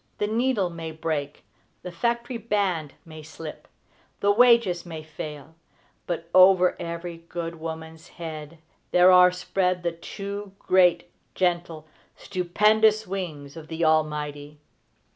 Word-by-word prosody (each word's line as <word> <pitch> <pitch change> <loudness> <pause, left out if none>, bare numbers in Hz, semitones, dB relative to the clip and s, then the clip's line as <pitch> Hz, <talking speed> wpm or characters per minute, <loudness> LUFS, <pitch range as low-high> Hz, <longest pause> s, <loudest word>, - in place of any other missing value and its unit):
The 210 - 0
needle 220 -4 0
may 165 -1 -6
break; 155 -2 -4 0.4
the 180 - -6
factory 235 +6 -2
band 195 -9 -1
may 155 -1 -11
slip; 155 0 -10 0.5
the 200 - +3
wages 230 -6 +4
may 160 -3 -8
fail; 150 -1 -8 0.5
but, 170 -1 -3
over 185 -1 +6
every 170 0 -5
good 165 -1 -5
woman's 160 0 -7
head 160 -1 -8 0.3
there 180 +1 +6
are 180 0 +7
spread 180 0 -1
the 170 - 0
two 200 +4 -7
great, 180 -3 +3 0.2
gentle, 170 -3 -1 0.3
stupendous 215 +4 +2
wings 160 -7 -6
of 160 -1 -10
the 165 +1 -2
Almighty. 150 -2 -1
175 Hz, 125 wpm, -25 LUFS, 160-195 Hz, 0.5 s, are